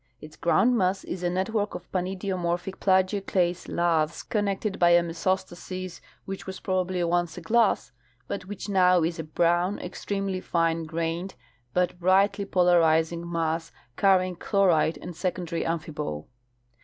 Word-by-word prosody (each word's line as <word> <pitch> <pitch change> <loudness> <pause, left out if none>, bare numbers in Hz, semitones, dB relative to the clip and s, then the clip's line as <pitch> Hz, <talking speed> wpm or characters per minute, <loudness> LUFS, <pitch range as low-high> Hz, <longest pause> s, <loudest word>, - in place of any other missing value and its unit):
Its 155 +3 -12
groundmass 195 0 +2
is 180 - -5
a 175 - 0
network 205 +4 -1
of 175 - -9
panidiomorphic 185 -1 -2
plagioclase 185 -2 +1
laths 165 -2 0
connected 205 -1 -1
by 175 - +5
a 175 0 +6
mesostasis 185 +1 -3 0.2
which 195 0 -6
was 190 0 -6
prolxibly 185 -2 -1
once 175 -1 0
a - - -6
glass, 220 +5 +2 0.4
but 195 - -4
which 205 +1 -7
now 180 -3 +4
is 165 +1 -1
a - - -2
brown, 175 +4 +1
extremely 195 +1 -3
fine 165 -2 0
grained, 165 +3 -3 0.4
but 180 +3 0
brightly 195 +3 +3
polarizing 170 -2 +2
mass 165 -1 -1 0.2
carrying 185 -2 +3
chlorite 175 -4 +2
and 175 -1 -8
secondary 175 -2 -2
amphibole. 150 - -3
180 Hz, 130 wpm, -26 LUFS, 170-190 Hz, 0.4 s, a